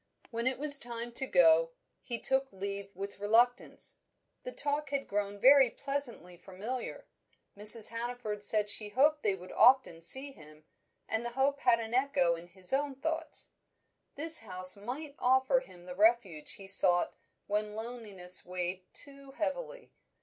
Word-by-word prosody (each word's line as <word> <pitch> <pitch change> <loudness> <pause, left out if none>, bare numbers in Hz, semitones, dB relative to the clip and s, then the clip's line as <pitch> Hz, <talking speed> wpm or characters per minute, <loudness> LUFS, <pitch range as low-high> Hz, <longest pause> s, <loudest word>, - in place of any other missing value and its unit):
When 230 +1 -3
it 260 - -1
was 285 0 +6
time 235 0 -7
to 265 +3 -3
go, 165 -3 +3 0.3
he 235 - -5
took 265 +2 +2
leave 200 +1 -7
with 200 +2 -8
reluctance. 235 +4 +2 0.4
The - - -8
talk 295 - -2
had 275 -1 -4
grown 205 0 -4
very 265 +3 +5
pleasantly 255 - -5
familiar. 200 +8 -8 0.5
Mrs. 210 +2 +7
Hannaford 230 -2 -6
said 210 0 +5
she 210 0 -2
hoped 295 +7 +1
they 200 -3 0
would 180 0 -13
often 250 -9 +3
see 265 +11 +4
him, 155 - -18 0.4
and 220 +1 -2
the 240 0 -6
hope 280 +1 0
had 235 -3 +2
an 225 0 -7
echo 255 -10 +1
in 170 +1 -9
his 185 +4 -2
own 280 0 -1
thoughts. 320 +4 -5 0.7
This 320 +3 0
house 185 -4 +2
might 260 +9 -8
offer 260 - +2
him 175 - -16
the 180 - -8
refuge 200 -6 0
he 195 - -13
sought 180 -2 +3 0.3
when 210 +1 -2
loneliness 215 -6 0
weighed 180 +1 -6
too 275 -1 -4
heavily. 485 - -6
230 Hz, 155 wpm, -30 LUFS, 195-270 Hz, 0.7 s, Mrs